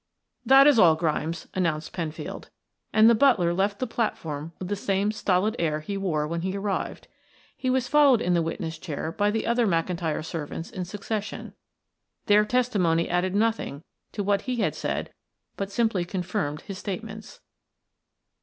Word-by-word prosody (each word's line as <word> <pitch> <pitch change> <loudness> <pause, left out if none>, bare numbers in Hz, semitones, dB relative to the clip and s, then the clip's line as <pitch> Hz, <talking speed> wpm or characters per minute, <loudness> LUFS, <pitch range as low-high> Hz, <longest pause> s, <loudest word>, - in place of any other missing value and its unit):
"That 270 +1 +8
is 285 -5 +6
all, 165 -5 +7
Grimes," 160 +1 -2
announced 165 -4 -1
Penfield, 165 -3 -5 0.4
and 220 0 +6
the 235 - +7
butler 215 -9 +4
left 200 +3 0
the 255 - -2
platform 160 - -3
with 185 - -6
the 205 - -1
same 200 +1 0
stolid 210 +1 +1
air 155 -2 0
he 200 +6 -5
wore 165 -6 -1
when 170 +1 -3
he 190 +2 -2
arrived. 200 -1 -3 0.5
He 255 - -2
was 255 -1 +1
followed 285 -4 +5
in 180 -5 +1
the 170 - +3
witness 165 -1 -4
chair 160 -2 -4
by 205 +4 +1
the 220 +1 -1
other 235 0 +2
McIntyre 165 -3 -1
servants 165 0 -5
in 185 -1 -4
succession. 205 +3 -5 0.7
Their 210 0 +5
testimony 210 -9 +1
added 180 +2 0
nothing 215 -9 0 0.3
to 205 - -2
what 200 0 +1
he 250 - 0
had 235 - 0
said - - -3 0.4
but 195 -1 -3
simply 215 -3 +1
confirmed 170 -5 -3
his 195 -2 -8
statements. 215 - -7
195 Hz, 165 wpm, -26 LUFS, 165-215 Hz, 0.7 s, That